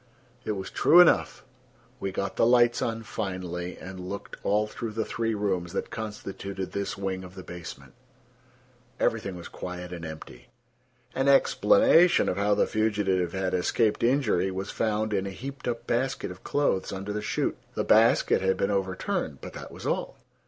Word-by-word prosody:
It 110 - 0
was 95 -2 -6
true 175 - +6
enough. 180 - +4 0.5
We 95 - -3
got 100 +1 -3
the - - +2
lights 120 -1 +4
on 115 0 -2
finally 90 -4 -4
and 95 0 -9
looked 100 0 -6
all 105 +1 +2
through 110 +1 -6
the 110 0 -1
three 115 -1 -1
rooms 95 -4 -1
that - - -3
constituted 100 -3 -5
this 100 +3 -3
wing 95 -1 -3
of 90 0 -11
the 95 - -8
basement. 80 -7 -9 1.1
Everything 105 -5 0
was 85 - -8
quiet 90 0 -7
and 85 -1 -7
empty. 80 +7 -9 0.7
An 135 +1 0
explanation 175 - +5
of 90 - -1
how 100 +1 +2
the - - +3
fugitive 100 -5 0
had 95 -1 -1
escaped 105 +4 +1
injury 115 -7 +2
was 95 +1 -4
found 110 -1 -1
in 100 -1 0
a - - -3
heaped 135 +8 -7
up 120 -1 -3
basket 130 -4 -1
of 90 - -12
clothes 140 -10 0
under 95 +2 -4
the 105 - -2
chute. 110 - -1 0.2
The - - 0
basket - - +4
had 95 0 +1
been 100 - 0
overturned, 95 -2 -2
but - - -9
that - - -9
was - - -10
all. - - -2
100 Hz, 175 wpm, -27 LUFS, 95-115 Hz, 1.1 s, true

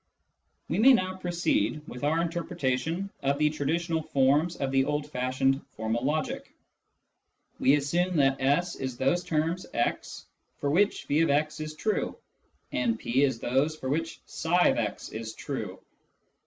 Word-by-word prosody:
We 165 - -1
may 260 +4 +8
now 185 -5 +1
proceed 170 -3 0
with 125 - -8
our 160 +3 +2
interpretation 165 +1 -2
of 140 +1 +1
the 150 0 +3
traditional 160 +3 -1
forms 145 +4 +2
of 135 -1 -2
the 135 0 +3
old 150 0 -1
fashioned 130 +1 +1 0.2
formal 110 +2 -1
logic. 155 +3 -2 1.1
We 135 - +5
assume 175 +6 0
that 135 -1 +3
S 145 +7 +2
is 130 -2 -4
those 155 +8 +1
terms 165 +3 -1
x 120 - -2 0.3
for 140 - -1
which 200 +6 +2
<f>x 150 0 +2
is 155 0 -5
true, 215 +6 -1 0.5
and 120 -3 0
P 125 +5 0
is 135 -4 +2
those 135 +7 +1
for 130 -4 -5
which 165 +3 -2 0.2
i/ix 160 - +2
is 110 0 -6
true. - - -5
150 Hz, 140 wpm, -28 LUFS, 135-165 Hz, 1.1 s, may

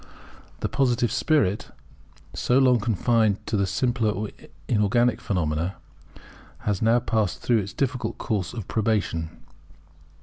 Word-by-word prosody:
The - - 0
Positive 120 -4 +1
spirit, 110 - +1 0.6
so 125 - +1
long 130 -3 +5
confined 110 -1 +1
to - - -2
the 100 -2 +1
simpler 110 -1 0 0.4
inorganic 120 +3 +2
phenomena, 85 -2 -1 0.9
has 105 -3 -1
now 115 +2 +4
passed 110 -5 -1
through 120 -2 +3
its 100 -1 -4
difficult 130 -2 -2
course 100 -6 -2
of 110 -5 -7
probation. 105 -7 0
110 Hz, 115 wpm, -25 LUFS, 100-120 Hz, 0.9 s, long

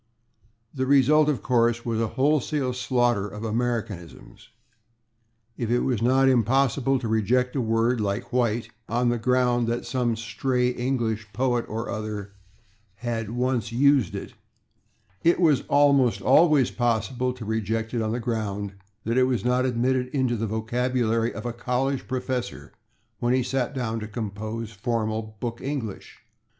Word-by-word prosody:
The 130 -2 -2
result, 145 +3 +5
of 145 - -1
course, 120 -2 +2
was 115 -1 -1
a 115 - +1
wholesale 140 -1 +1
slaughter 120 -5 +1
of 105 +1 -8
Americanisms. 110 - -4 1.1
If 115 - -2
it 120 +1 +2
was 125 -5 0
not 130 +3 +4
impossible 130 +2 +2
to 125 -3 -4
reject 120 +4 +1
a 135 - +1
word, 115 +1 +1
like 100 +2 -3
White, 120 -2 0 0.2
on 120 +1 +1
the 120 0 0
ground 125 0 +2
that 120 +1 -2
some 125 -3 0
stray 125 +3 0
English 120 -4 -2
poet 120 0 0
or 115 +2 -4
other 105 -2 -5 0.7
had 115 -3 -2
once 120 -1 -1
used 135 -4 +3
it, - - -6 0.9
it 170 +1 +4
was 155 -6 +3
almost 140 -4 +4
always 150 -1 +4
possible 120 +1 0
to 120 -3 -9
reject 110 +1 -2
it 120 - 0
on 110 0 -1
the 120 - -1
ground 105 -4 -3 0.3
that 115 +3 +1
it 130 - +5
was 125 -2 -1
not 125 +1 +2
admitted 125 +1 +1
into 130 -2 0
the 115 0 -2
vocabulary 115 +1 0
of 110 - -8
a 120 - -2
college 125 +3 -1
professor 130 -1 -4 0.5
when 120 +1 +2
he 130 - +1
sat 130 +2 -2
down 115 -3 -2
to 110 - -6
compose 110 +1 -5
formal 110 -1 -3
book 120 0 -4
English. 130 -7 -5
120 Hz, 150 wpm, -25 LUFS, 110-130 Hz, 1.1 s, result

